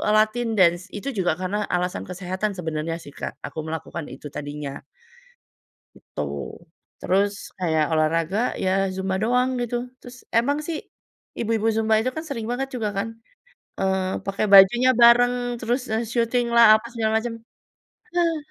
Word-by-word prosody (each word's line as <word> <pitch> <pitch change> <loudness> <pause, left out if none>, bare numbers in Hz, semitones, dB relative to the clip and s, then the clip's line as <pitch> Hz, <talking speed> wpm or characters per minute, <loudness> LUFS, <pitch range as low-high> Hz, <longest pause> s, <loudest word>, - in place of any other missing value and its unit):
latin 220 +3 +2
dance. 175 -1 +4
Itu 240 +7 -4
juga 180 -3 +2
karena 190 +3 -1 0.2
alasan 180 0 -2
kesehatan 185 +3 -3
sebenarnya 160 -1 -3
sih 145 - -12
Kak, - - -4
aku - - -7
melakukan 160 0 -5
itu - - -9
tadinya 145 -1 -5 1.2
gitu. - - -10 0.8
Terus 200 +2 +2 0.3
kayak 160 -4 +1
olahraga 165 +4 +1 0.3
ya 185 - +2 0.2
zumba 190 0 -2
doang 250 +3 +2
gitu, 240 0 -2 0.2
terus 250 0 -12 0.2
emang 280 +5 +1
sih 320 -2 -2 0.6
ibu-ibu 225 -1 0
zumba 220 0 +2
itu 255 +3 -1
kan 315 - -4
sering 230 -6 -4
banget 265 +2 -2
juga 225 -4 -1
kan, 210 +3 -1 0.7
eee, 190 -1 0
pakai 195 +2 -1
bajunya 210 +6 +8
bareng 240 +1 +7 0.3
terus, 245 +3 0
eee, 225 +2 0
syutinglah 235 0 +3
apa 215 - -7
segala 220 -2 0
macem. 230 +1 -4 0.8
Heeh. 340 -2 +2
215 Hz, 145 wpm, -23 LUFS, 180-240 Hz, 1.2 s, bajunya